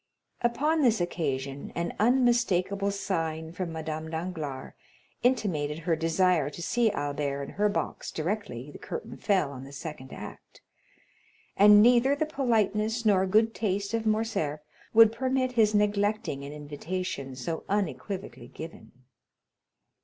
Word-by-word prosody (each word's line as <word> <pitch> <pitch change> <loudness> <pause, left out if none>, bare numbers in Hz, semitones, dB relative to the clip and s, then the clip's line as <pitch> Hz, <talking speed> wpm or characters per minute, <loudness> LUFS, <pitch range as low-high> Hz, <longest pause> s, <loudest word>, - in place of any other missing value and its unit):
Upon 300 +7 +1
this 235 -6 +4
occasion 140 -6 -3
an 170 0 -2
unmistakable 215 -5 +2
sign 165 -5 -2
from 175 0 -4
Madame 160 0 -4
Danglars 160 -5 -5 0.5
intimated 175 - +1
her 165 0 0
desire 165 -1 +2
to 150 - -10
see 235 +3 +2
Albert 145 -3 -2
in - - -7
her 210 0 +1
box 205 - -3
directly 155 - -4
the - - -11
curtain - - -6
fell 190 -9 +1
on 130 -2 -8
the 135 - -11
second 140 -2 -8
act, - - -10 0.9
and 210 +1 +8
neither 245 +3 +5
the 310 - 0
politeness 225 -5 0
nor 190 -3 +4
good 220 +4 +3
taste 200 0 -2
of 225 -1 0
Morcerf 215 -9 0 0.3
would 225 -1 +7
permit 255 +2 0
his 220 -3 +3
neglecting 205 -6 +1
an 140 - -7
invitation 150 -1 -5
so 160 +6 -4
unequivocally 195 0 -3
given. 160 +1 -10
190 Hz, 130 wpm, -28 LUFS, 155-220 Hz, 0.9 s, and